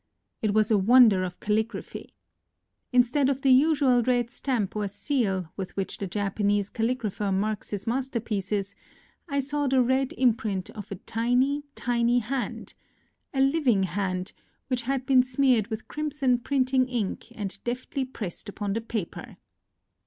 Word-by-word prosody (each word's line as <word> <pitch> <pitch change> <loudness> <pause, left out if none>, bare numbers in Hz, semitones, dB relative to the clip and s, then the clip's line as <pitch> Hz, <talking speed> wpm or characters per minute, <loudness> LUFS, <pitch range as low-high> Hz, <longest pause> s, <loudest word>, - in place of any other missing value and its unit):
It 215 -2 0
was 215 +1 +3
a 210 - +5
wonder 220 -2 +6
of 180 -1 -5
calligraphy. 220 +2 -3 0.8
In 250 -1 +6
stead 265 +3 +1
of 270 -1 -1
the 270 - +5
usual 270 -2 +4
red 240 -1 +1
stamp 230 -9 -2
or 210 -1 -1
seal 200 - -1
with 190 -2 -6
which 195 - -3
the 200 - -3
Japanese 205 +1 0
calligrapher 225 -4 -1
marks 205 +2 -1
his 205 -1 -4
masterpieces, 215 -5 -2 0.6
I 280 0 0
saw 290 +1 -1
the 265 0 +3
red 260 +1 +2
imprint 220 -7 0
of 210 -2 -9
a - - -2
tiny, 250 +8 0
tiny 240 0 +1
hand, 245 +2 -3 0.3
— - - -40 0.3
a 270 - 0
living 270 -8 +3
hand, 185 0 -2 0.4
which 250 -2 0
had 260 +2 -2
been 265 -2 +6
smeared 250 -3 +2
with 220 -1 -6
crimson 290 -5 0
printing 260 0 +1
ink 235 -6 -3
and 200 -2 -5
deftly 255 +3 -3
pressed 210 -6 -7
upon 205 -1 -3
the 225 - -1
paper. 220 -5 -5
235 Hz, 150 wpm, -26 LUFS, 205-260 Hz, 0.8 s, wonder